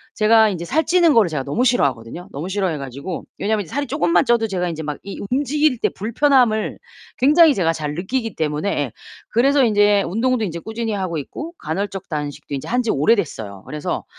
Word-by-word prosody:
제가 220 0 +5
인제 175 -4 -4
살 315 - +1
찌는 345 -2 +4
거를 220 -8 +4
제가 150 -4 -3
너무 145 - -1
싫어하거든요. 140 - 0
너무 155 +6 -5
싫어해 190 -5 -1
가지고 140 +6 -6 0.2
왜냐면 215 0 0
인제 165 - -15
살이 285 0 -1
쪼끔만 175 -5 +2
쪄도 235 -2 +2
제가 180 -3 -2
인제 160 -1 -5
막 150 -1 -4
이 200 - -7
움직일 290 0 +1
때 - - +2
불편함을 235 0 +1 0.4
굉장히 300 +2 +5
제가 170 -3 +2
잘 150 -2 -4
느끼기 225 +5 -3
때문에 150 +4 -1
예. 145 - -2 0.4
그래서 275 +4 +3
인제 205 -3 +4
운동도 230 +6 0
인제 170 -3 -5
꾸준히 225 +4 -4
하고 185 -5 -2
있고 310 - -6
간헐적 195 +4 -4
단식도 145 -1 -5
인제 135 - -6
한 245 +1 +1
지 230 - 0
오래됐어요. 140 - 0
그래서 150 -1 -4
200 Hz, 425 characters per minute, -20 LUFS, 160-240 Hz, 0.4 s, 제가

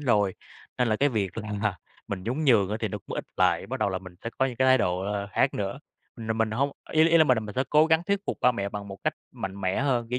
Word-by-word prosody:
rồi, 105 -8 +2 0.4
nên 125 -1 +2
là 110 - +2
cái 140 +5 +3
việc 105 -7 -1
là 105 -1 -2 0.3
mình 95 -2 -4
nhún 130 +10 -2
nhường 110 -8 +4
á 105 - -1
thì 110 - 0
nó - - -4
cũng - - -5
ít - - -3
lại, - - +2
bắt - - -5
đầu - - +2
là 95 -1 -2
mình 95 -1 -12
sẽ 115 - -3
có 130 - +3
những 125 - -5
cái 130 - +3
thái 130 0 +6
độ, 90 -4 0
ờ, 100 +1 -3
khác 135 - +2
nữa. 100 +5 -3 0.4
Là 110 -1 -2
mình 110 0 0
hông 135 +6 0 0.2
ý 160 +1 +5
ý 165 0 +5
là 160 - +7
mình 130 -4 +4
là - - 0
mình 105 -2 -7
sẽ 130 - +1
cố 155 +1 +6
gắng 160 0 +3
thuyết 200 -1 +1
phục - - -2
ba 125 - +5
mẹ 100 -4 -2
bằng 100 0 -6
một 95 - -7
cách - - +1 0.2
mạnh 95 +1 -6
mẽ 95 +3 0
hơn, 125 -4 +1
kiểu 125 - 0
110 Hz, 300 wpm, -27 LUFS, 100-130 Hz, 0.4 s, là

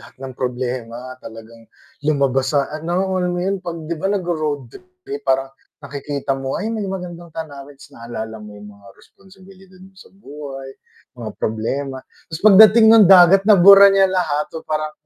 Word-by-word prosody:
lahat - - -17
ng 130 0 -9
problema 125 -1 -5
talagang 115 0 -14 0.3
lumabas 140 -2 0
sa 140 - -1
ano, 175 +5 -3
alam 180 0 -2
mo - - -3
'yun? 195 0 -2
'Pag 170 -3 -8
'di 170 - -4
ba, 195 - -1
'pag 205 - 0
nagro-roadtrip 155 - -5 0.2
kayo 140 +1 -6
parang 135 0 0 0.3
nakikita 140 0 -5
mo 135 0 -4
nga, 200 - -5
"Ayun, 225 - -3
may 200 - -4
magandang 175 -2 -8
tanawin." 145 -3 -9
Ta's 140 +1 -18
naalala 110 -2 -8
mo 105 -1 -12
yung 105 0 -13
mga 100 - -20
responsibilidad 190 0 -20
mo 195 - -18
sa 190 - -18
buhay, 140 -7 -11 0.5
mga 110 -2 -6
problema, 130 +5 -4 0.4
ta's 160 - -6
pagdating 215 +2 +6
ng 225 -1 +7
dagat 190 +1 +6
nabura 200 -1 +7
niya 195 -1 +3
lahat 165 -5 -2
so 160 - -10
parang 155 0 -4
150 Hz, 175 wpm, -18 LUFS, 135-190 Hz, 0.5 s, ng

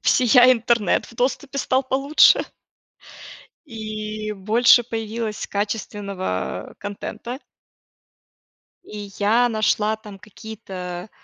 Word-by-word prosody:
всея 250 0 +6
интернет 235 -4 +1
в - - -16
доступе 270 +2 -2
стал 260 0 +1
получше. 275 +3 +4 1.2
И 215 -2 -5
больше 225 +5 +4
появилось 225 -1 -4
качественного, 200 - -4
а, - - -17
контента. 225 +5 -7 1.5
И 205 -1 -9
я 225 +4 +3
нашла 215 -1 +1
там 210 -3 -12
какие-то, 190 -3 -8
215 Hz, 90 wpm, -22 LUFS, 205-240 Hz, 1.5 s, всея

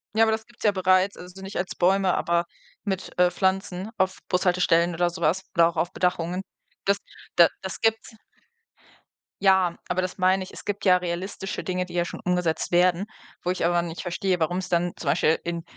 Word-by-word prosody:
Ja, 225 - +5
aber 220 - +3
das 220 0 -2
gibt's 240 0 -16
ja 210 - +5
bereits, 185 +1 +2
also 180 +2 -11
nicht 195 +1 -6
als 180 - -3
Bäume, 190 +1 +3
aber 170 0 +1 0.4
mit, 190 -4 -4
äh, 180 0 +6
Pflanzen 190 +2 -1
auf 190 -2 +1
Bushaltestellen 175 -2 +2
oder 175 +1 +2
so 170 - -9
was 175 +5 +1
oder 165 0 +6
auch 170 - -9
auf 170 +2 0
Bedachungen. 180 0 0 0.4
Das 200 0 +3 0.4
da 170 -1 +8
das 190 -3 -6
gibt's. 225 0 0 1.3
Ja, 190 -3 +4
aber 180 +1 0
das 185 +1 -4
meine 185 +1 +3
ich, - - -11
es - - -11
gibt 205 0 -3
ja 185 -2 +6
realistische 180 +2 -4
Dinge, 180 -1 -2
die 180 - -12
ja 175 -1 +1
schon - - -7
umgesetzt 180 -3 0
werden, 180 +2 +3 0.4
wo 180 - -2
ich 185 - -1
aber 175 0 +3
nicht 170 -1 -5
verstehe, 180 +1 -1
warum's 180 +3 0
dann 175 0 +1
zum 145 - -3
Beispiel 155 +3 +3
in 170 -1 -3
180 Hz, 200 wpm, -25 LUFS, 175-190 Hz, 1.3 s, da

